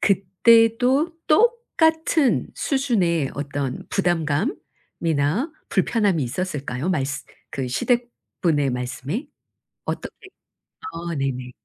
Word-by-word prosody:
그때도 230 - +4 0.2
똑같은 320 - +3
수준의 190 - +1
어떤 140 -2 -3
부담감 175 - 0 0.5
이나 165 - +1 0.2
불편함이 200 -4 +2
있었을까요? 140 0 -3
말쓰 140 -5 -1 0.3
그 130 -2 -3
시댁 240 - +1 0.3
분의 145 -5 +2
말씀에? 130 - -4 0.6
어떻게 385 - -6 0.5
아 170 - -5
네네. 130 -2 -2
180 Hz, 210 characters per minute, -23 LUFS, -, 0.6 s, 그때도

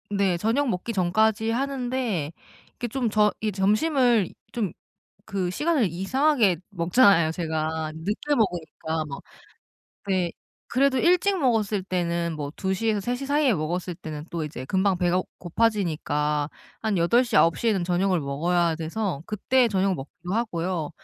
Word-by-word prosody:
네 200 -3 +1
저녁 235 +9 +1
먹기 185 +3 -2
전까지 220 +4 +2
하는데 250 - -1 0.4
이게 245 - -4
좀 240 0 -1
저 210 0 +3
이 215 -1 0
점심을 225 - +3
이 - - -14 0.2
좀 210 -7 -2 0.5
그 190 -4 -2
시간을 295 - +1
이상하게 210 - +2
먹잖아요 175 -2 +4
제가. 160 -1 -2
늦게 210 - -1
먹으니까 165 - -1
뭐. 140 -1 -7 0.9
네. 185 -3 +1 0.4
그래도 265 +1 +2
일찍 360 +5 +3
먹었을 220 - +1
때는 170 -2 -1
뭐 145 -2 -4
2 190 0 -1
시에서 215 +2 0
3 240 +5 -2
시 275 +2 -6
사이에 285 -2 +3
먹었을 175 +1 -2
때는 150 -2 -7
또 165 -2 -3
이제 145 -4 -6
금방 190 +5 +1
배가 175 +1 +2 0.2
고파지니까 155 -7 0 0.3
한 220 -3 0
8 235 +10 +4
시, 235 -3 -1
9 165 -2 +4
시에는 210 -6 +1
저녁을 180 0 +1
먹어야 165 +4 +1
돼서 165 -1 -3
그때 245 +4 +2
저녁을 195 -2 +1
먹기도 175 +6 -8
하고요. 175 -8 -2
190 Hz, 290 characters per minute, -25 LUFS, 170-230 Hz, 0.9 s, 먹잖아요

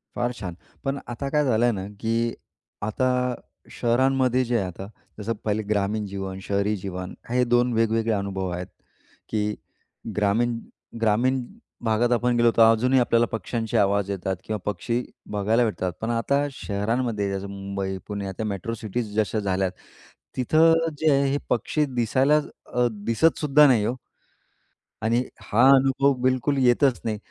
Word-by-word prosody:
फार 120 0 0
छान. 90 -4 -5 0.3
पण 135 0 -1
आता 125 +3 -4
काय 150 0 +2
झालं 120 -1 +3
ना, 95 0 -5
की 115 +1 0 0.5
आता 110 +5 0 0.6
शहरांमध्ये 130 +1 +2
जे 120 0 +1
आहे, 100 - 0
आता, 95 +2 -8 0.3
जसं 110 +2 -2
पहिले 110 0 0
ग्रामीण 105 0 -1
जीवन, 95 -1 -5
शहरी 100 +1 0
जीवन, 90 -1 -6 0.2
हे 125 +1 +2
2 120 0 +2
वेगवेगळे 115 0 +1
अनुभव 95 -2 -2
आहेत, 90 +1 -4 0.6
की 105 -1 -1 0.6
ग्रामीण 115 +3 +1 0.4
ग्रामीण 120 +4 +2 0.4
भागात 115 +2 +2
आपण 120 0 +2
गेलो, 120 0 +5
तर 115 - +6
अजूनही 125 +4 +3
आपल्याला 120 -1 +3
पक्ष्यांचे 115 0 -2
आवाज 100 0 +2
येतात 95 0 -2
किंवा 110 - -2
पक्षी 115 +5 -1 0.3
बघायला 105 +4 +2
भेटतात. 95 -5 -2
पण 110 - -2
आता 140 +5 +1
शहरांमध्ये 105 -2 -2
जसं 95 +1 -4
मुंबई, 100 -1 -4
पुणे, 100 -1 -4
आता 95 +3 -5
मेट्रो 105 +2 -3
सिटीज 110 0 -4
जशा 110 +1 0
झाल्यात, 95 -2 0 0.7
तिथं 160 +6 +4 0.2
जे 155 0 +3
आहे 140 0 +3
हे 140 - +1
पक्षी 150 +5 +1
दिसायला 130 +5 +3 0.4
अ, 125 0 +3 0.2
दिसतसुद्धा 150 +3 +4
नाही 115 -5 +3
हो. 120 - -1 1.1
आणि 115 +3 +2 0.2
हा 130 - +3
अनुभव 135 +1 +3
बिलकुल 130 +2 +1
येतच 125 +1 +3
नाही. 110 -2 -1
115 Hz, 145 wpm, -24 LUFS, 100-125 Hz, 1.1 s, तर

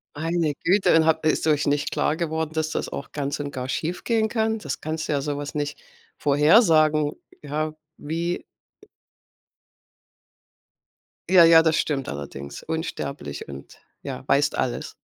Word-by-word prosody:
Meine 165 0 0
Güte 190 -1 +4
und 160 -1 +5
habt 160 0 +2
ist 155 - +2
euch 150 -2 +2
nicht 145 +1 0
klar 150 - +1
geworden, 160 -2 -2
dass 160 0 -1
das - - -3
auch 140 - -7
ganz 145 -1 -3
und 145 -1 -4
gar 130 -2 -5
schiefgehen 220 - -1
kann? 220 0 0
Das - - -5
kannst 155 0 -3
du - - -2
ja 140 - 0
sowas 145 0 -4
nicht 145 0 -3 0.4
vorhersagen, 155 - +4 0.3
ja, 155 +1 -2 0.2
wie 170 +3 -3 2.9
Ja, 185 -2 +8
ja, 165 0 +8
das 160 -1 +2
stimmt 140 -3 -1
allerdings 70 0 -7
unsterblich 140 - -5
und 70 0 -10 0.3
ja, - - -6
weißt - - +2
alles. - - -2
155 Hz, 145 wpm, -24 LUFS, 145-165 Hz, 2.9 s, Ja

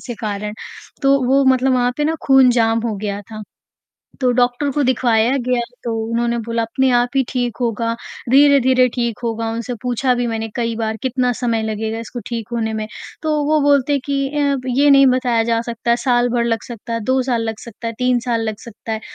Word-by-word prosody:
से 240 - -6
कारण। 210 -1 -4 0.5
तो 275 0 +4
वो 270 +1 +3
मतलब 260 0 +3
वहाँ 245 0 +1
पे 295 - 0
ना 320 +1 +1
खून 265 -2 +6
जाम 230 -1 +2
हो 215 - -2
गया 205 0 -4
था, 215 +1 -9 0.8
तो 250 -1 +3
डॉक्टर 245 +3 +1
को 290 - 0
दिखवाया 245 -1 +2
गया 250 -1 +1 0.2
तो 235 - -2 0.2
उन्होंने 235 0 0
बोला 230 0 -1
अपने 260 +4 0
आप 245 0 +3
ही 270 - +4
ठीक 245 -3 -2
होगा, 230 -1 -1 0.4
धीरे-धीरे 265 -2 +5
ठीक 235 -3 -2
होगा। 225 0 -2
उनसे 235 +2 -4
पूछा 250 +1 +1
भी 245 0 -1
मैंने 225 -1 -3
कई 230 -1 -1
बार 220 -1 -2
कितना 255 -1 0
समय 230 -2 -1
लगेगा 220 +1 -3
इसको 235 +1 -7
ठीक 230 -2 -4
होने 225 -2 -1
में? 215 0 -3 0.4
तो 315 - -1
वो 305 +1 +2
बोलते 285 0 +3
कि 275 -1 -1
अ, 285 -1 0
"ये 275 +4 +3
नहीं 275 -1 +7
बताया 250 -3 +2
जा 230 0 +1
सकता 235 0 -3
है 235 - +4
साल 245 -1 +1
भर 240 -1 0
लग 230 -2 -1
सकता 235 -1 -7
है, 230 - -1
2 260 +4 +1
साल 245 -3 -1
लग 225 -1 -4
सकता 235 0 -9
है, - - -4
3 250 -1 +2
साल 235 -2 -1
लग 215 - -4
सकता 225 0 -8
है।" 220 - -3
240 Hz, 215 wpm, -19 LUFS, 230-260 Hz, 0.8 s, नहीं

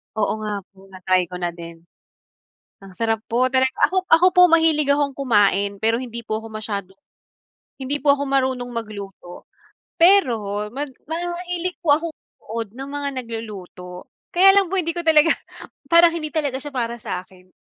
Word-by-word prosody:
Oo 215 -2 0
nga 210 -1 -3
po, 195 0 -20
na-try 185 0 +1
ko 180 - -6
na 175 -1 -3
din. 170 -1 -10 1.1
Ang 195 - -12
sarap 225 +3 -2
po 245 +2 +1
talaga. 260 0 +2 0.2
Ako 375 0 -1
ako 330 +3 +7
po, 360 - +8
mahilig 320 -3 +4
akong 285 -1 0
kumain 200 -6 +1
pero 225 +1 +2
hindi 235 -1 -6
po 215 -1 -3
ako 225 - -10
masyado 205 -3 -5 0.9
hindi 275 +2 -2
po 290 - +4
ako 285 0 -3
marunong 260 -2 0
magluto. 200 -5 -8 0.5
Pero 230 - +3
mag 285 +2 -4 0.2
mahilig 350 +1 -4
po 315 - +3
akong 325 +1 -4
manood 225 -1 -8
ng 270 +2 -7
mga 285 0 -3
nagluluto. 195 -6 -9 0.2
Kaya 370 +3 +6
lang 395 -2 +4
po 390 - 0
hindi 335 -1 -1
ko 345 - -2
talaga 320 0 +5 0.6
parang 335 0 +6
hindi 310 -2 -4
talaga 290 -5 -1
siya 290 +1 -8
para 235 -2 -2
sa'kin. 185 -1 -8
245 Hz, 165 wpm, -21 LUFS, 205-310 Hz, 1.1 s, po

